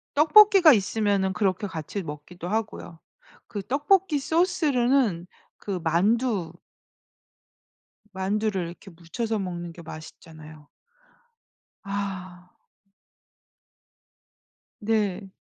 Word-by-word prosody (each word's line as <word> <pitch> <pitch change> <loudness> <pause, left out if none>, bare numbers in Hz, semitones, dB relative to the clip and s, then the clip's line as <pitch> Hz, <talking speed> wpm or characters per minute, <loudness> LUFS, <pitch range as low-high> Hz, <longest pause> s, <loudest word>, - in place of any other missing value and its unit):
떡볶이가 355 +2 +7
있으면은 200 -2 0
그렇게 195 +2 -1
같이 185 +2 -5
먹기도 160 +3 -8
하고요. 210 -6 -4 0.5
그 205 -3 -5
떡볶이 295 - +1
소스로는 275 - +1 0.3
그 195 -3 -4
만두 190 +2 +1 1.6
만두를 195 -1 -1
이렇게 175 +3 -12
묻혀서 210 +7 -4
먹는 175 -3 -5
게 170 - -12
맛있잖아요. 155 -1 -12 1.2
아. 185 -3 -6 2.3
네. 205 -3 -1
200 Hz, 190 characters per minute, -25 LUFS, 175-235 Hz, 2.3 s, 떡볶이가